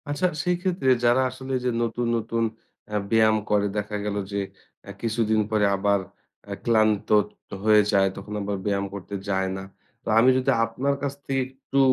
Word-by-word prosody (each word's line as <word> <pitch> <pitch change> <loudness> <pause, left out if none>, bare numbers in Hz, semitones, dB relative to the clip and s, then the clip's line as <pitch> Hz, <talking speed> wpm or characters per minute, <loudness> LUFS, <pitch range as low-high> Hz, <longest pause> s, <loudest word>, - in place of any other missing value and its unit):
আচ্ছা 145 +5 0 0.2
সেই 180 0 +2
ক্ষেত্রে, 180 -7 0 0.2
যারা 120 +2 +4
আসলে 130 +1 -7
যে - - +2
নতুন, 120 +1 -2
নতুন, 115 +1 -1 0.5
আ - - 0 0.2
ব্যায়াম 110 -1 +4
করে 105 -1 +2
দেখা 105 0 -2
গেল 105 -1 -2 0.2
যে 100 0 -1 0.5
আ - - -4
কিছুদিন 110 -1 +1
পরে 105 -1 +3
আবার 100 0 +2 0.5
আ - - -1
ক্লান্ত 110 -3 +2 0.5
হয়ে 105 -1 +6
যায় 95 -1 +4
তখন 100 +1 -8
আবার 100 0 -2
ব্যায়াম 100 -1 0
করতে 100 0 -6
যায় 95 -1 0
না। 95 - -6 0.4
তো - - -15
আমি 125 +3 +6
যদি 130 +1 +2
আপনার 130 +5 -1
কাছ 140 -1 -1
থেকে 135 -1 0
একটু 135 +1 -3
110 Hz, 175 wpm, -25 LUFS, 100-130 Hz, 0.5 s, হয়ে